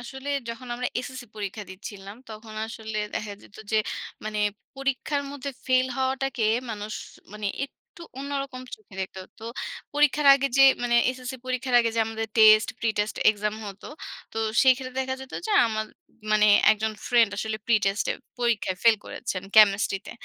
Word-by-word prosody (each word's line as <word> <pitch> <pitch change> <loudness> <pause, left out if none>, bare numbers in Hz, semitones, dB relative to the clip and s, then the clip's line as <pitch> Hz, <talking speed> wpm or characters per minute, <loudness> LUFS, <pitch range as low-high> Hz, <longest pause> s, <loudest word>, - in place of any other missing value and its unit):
আসলে 265 +3 -8 0.2
যখন 235 +2 -6
আমরা 250 +1 -2
এসএসসি 255 0 -7
পরীক্ষা 210 0 -5
দিচ্ছিলাম, 200 +1 -9
তখন 215 0 -10
আসলে 220 -1 -5 0.2
দেখা 210 -1 -3
যেত - - -17 0.2
যে, - - +4 0.5
মানে 215 0 -3 0.4
পরীক্ষার 275 +1 -1
মধ্যে 280 0 -5 0.2
ফেইল 255 0 +3
হওয়াটাকে 265 -2 -1 0.3
মানুষ 210 0 -5 0.4
মানে 210 -1 -4 0.2
একটু 310 +4 -16 0.2
অন্যরকম 275 -2 -4
চোখে 430 - -19
দেখতে। 190 0 -5 0.2
তো 220 - -10 0.5
পরীক্ষার 295 0 +3
আগে 275 0 +1
যে, - - +9 0.2
মানে 240 0 +1 0.2
এসএসসি 255 +1 -6
পরীক্ষার 255 0 -2
আগে 230 -1 +1
যে, - - +3
আমাদের 225 0 -3
টেস্ট, 215 0 +8
প্রিটেস্ট 215 -2 0
এক্সাম 210 0 -2
হত। 195 -1 -9 0.5
তো 225 - -4 0.2
সেখানে 260 -1 +3
দেখা 260 0 -1
যেত 265 0 -11
যে, 435 - -1
আমার 215 -1 -2 0.5
মানে 210 0 +5 0.3
একজন 220 +1 -2
ফ্রেন্ড, 235 -3 +4
আসলে 220 0 -2
প্রিটেস্ট 205 -3 +2
এ, - - -5 0.3
পরীক্ষায় 230 -6 +1
ফেইল 230 -1 +6
করেছেন, 195 -7 -4
কেমিস্ট্রিতে। 200 -2 +5
230 Hz, 155 wpm, -26 LUFS, 215-260 Hz, 0.5 s, যে